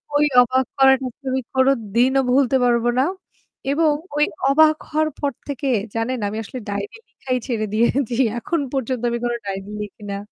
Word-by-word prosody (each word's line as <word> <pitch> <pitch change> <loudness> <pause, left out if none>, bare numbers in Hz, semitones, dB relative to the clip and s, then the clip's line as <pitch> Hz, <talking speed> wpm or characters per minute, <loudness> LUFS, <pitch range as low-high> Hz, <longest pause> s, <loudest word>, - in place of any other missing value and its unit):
ওই 295 +1 +4 0.2
অবাক 255 +1 +2
করাটা 265 -1 +5 0.2
আমি 260 0 0
কোনদিনও 260 0 +2
ভুলতে 265 0 +3
পারব 240 -1 +2
না। - - +4 0.7
এবং 305 0 +3 0.2
ওই 295 - +4 0.2
অবাক 310 +2 +5
হওয়ার 310 0 +1
পর 285 -1 0 0.2
থেকে 280 0 -3 0.3
জানেন 235 +2 -1
আমি 215 +2 -4
আসলে 255 +5 -7
ডায়রি 200 - -4
লিখাই 255 -1 -3
ছেড়ে 220 -3 -1
দিয়েছি। 235 +2 +1 0.2
এখন 330 +7 -1
পর্যন্ত 255 -2 -2
আমি 235 - -1
কোনো 240 0 0
ডায়রি 195 0 -5
লিখি 210 +1 -9
না। 200 - -3
255 Hz, 165 wpm, -21 LUFS, 230-275 Hz, 0.7 s, করাটা